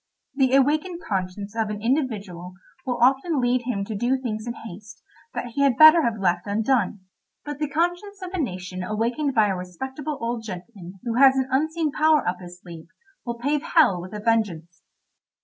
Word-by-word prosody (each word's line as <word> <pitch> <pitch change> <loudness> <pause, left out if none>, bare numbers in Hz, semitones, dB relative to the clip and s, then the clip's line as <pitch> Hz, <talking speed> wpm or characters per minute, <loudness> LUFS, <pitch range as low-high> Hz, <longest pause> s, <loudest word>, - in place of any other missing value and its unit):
The 265 -1 +2
awakened 305 +6 +2
conscience 200 +2 -3
of 220 -2 -1
an 210 -1 -4
individual 210 - -2 0.3
will 250 -1 -1
often 270 +5 +3
lead 245 -1 +1
him 200 -6 -2
to 220 - -5
do 240 +6 +1
things 230 -3 -5
in 235 - -2
haste 210 -2 -11 0.3
that 245 - -3
he 280 - -1
had 275 -4 +3
better 310 +2 +9
have 235 -6 0
left 175 0 0
undone, 215 -1 0 0.4
but 295 -1 -6
the 300 -2 -1
conscience 350 +6 -1
of 360 - -6
a 375 - -2
nation 185 -6 -5
awakened 235 +8 -1
by 220 -2 +5
a 190 - 0
respectable 265 - -6
old 230 0 -3
gentleman 185 -2 -9
who 235 -1 -2
has 270 0 +7
an 265 -1 0
unseen 315 +3 0
power 310 +1 +3
up 180 - -1
his 175 -1 -11
sleeve 165 -2 -11 0.4
will 235 0 -3
pave 285 +4 0
hell 250 - +3
with 185 +4 -9
a - - -4
vengeance. 205 -7 -1
235 Hz, 185 wpm, -24 LUFS, 195-275 Hz, 0.4 s, better